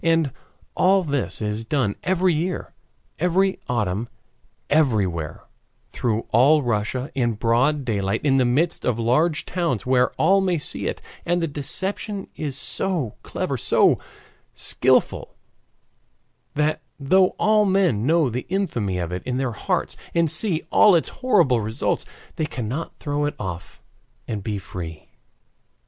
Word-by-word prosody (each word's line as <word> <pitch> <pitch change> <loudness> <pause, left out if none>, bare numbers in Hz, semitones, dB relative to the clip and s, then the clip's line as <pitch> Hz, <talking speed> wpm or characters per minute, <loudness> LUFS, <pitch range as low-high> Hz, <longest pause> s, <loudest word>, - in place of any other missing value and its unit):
And 165 -4 +2 0.4
all 190 +1 +3
this 140 -7 -2
is 105 +1 -2
done 115 -4 0
every 185 0 +2
year, 170 +3 -3 0.5
every 185 +3 +2
autumn, 110 -2 -1 0.6
everywhere, 100 - +1 0.5
through 115 -2 -1
all 140 +6 +5
Russia 120 +3 -1
in 120 -3 +1
broad 125 +6 +1
daylight 100 -2 -1
in 135 -2 +4
the 130 - +4
midst 155 +8 +1
of 120 -3 0
large 155 +9 +1
towns, 170 - -1
where 125 -1 +3
all 195 +1 +3
may 185 -3 +1
see 145 - -4
it, - - -4 0.2
and 175 +1 +1
the 170 - 0
deception 190 +8 -2
is 145 -4 -3
so 160 - -1
clever, - - -3
so - - +3 0.6
skillful, - - +1 1.2
that 150 +1 +1 0.2
though 185 +7 +3
all 215 0 +3
men 185 - +2
know 160 +2 +3
the 125 +1 -4
infamy 120 - -1
of 85 -1 -3
it 90 0 -3
in 125 +3 -3
their 130 -2 -1
hearts, 110 - -2 0.2
and 165 -2 +3
see 180 -7 0
all 210 -4 +6
its 165 - +1
horrible 175 - +2
results, 110 +5 -1 0.3
they 155 -2 0
cannot 130 +6 -4
throw 145 -1 -1
it 145 - -2
off 90 -3 -7 0.4
and 105 -3 -4
be 105 -1 -2
free. 90 -5 -8
140 Hz, 140 wpm, -23 LUFS, 115-170 Hz, 1.2 s, all